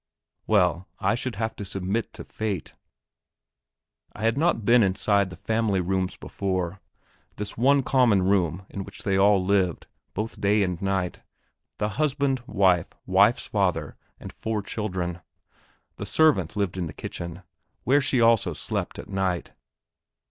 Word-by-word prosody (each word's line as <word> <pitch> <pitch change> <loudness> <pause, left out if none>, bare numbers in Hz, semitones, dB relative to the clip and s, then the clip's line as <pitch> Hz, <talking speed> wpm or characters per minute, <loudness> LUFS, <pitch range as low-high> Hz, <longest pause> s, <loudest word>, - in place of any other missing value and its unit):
Well, 95 -3 +2
I 100 - +2
should 120 0 -3
have 110 +2 -2
to - - -5
submit 95 +3 -2
to - - -8
fate. 105 -7 -4 1.4
I - - -8
had 115 +1 +2
not 145 -7 +1
been 120 +2 +6
inside 100 0 +2
the 90 - -9
family 110 +1 0
rooms 95 0 -1
before, 95 -1 -3 0.5
this 105 -1 -5
one 135 +4 +4
common 120 -8 +3
room 95 -2 +1
in 100 - -4
which 100 - -9
they 100 -1 +1
all 100 -1 +4
lived, 95 -3 +1 0.3
both 110 +3 -4
day 105 +1 +3
and 90 -1 -2
night 95 -2 -1 0.6
the 105 - -1
husband, 140 +1 0
wife, 95 -5 +2
wife's 100 +5 +4
father, 90 -7 0 0.2
and - - -9
four 110 -2 -3
children. 90 -5 -3 0.8
The - - -5
servant 140 - +3
lived 100 -3 -1
in 90 -2 -2
the 80 - -8
kitchen, 85 +5 -7 0.4
where 140 +3 +4
she 130 -2 +1
also 115 -2 +4
slept - - -4
at - - -8
night. 95 -3 -2
100 Hz, 150 wpm, -25 LUFS, 95-110 Hz, 1.4 s, been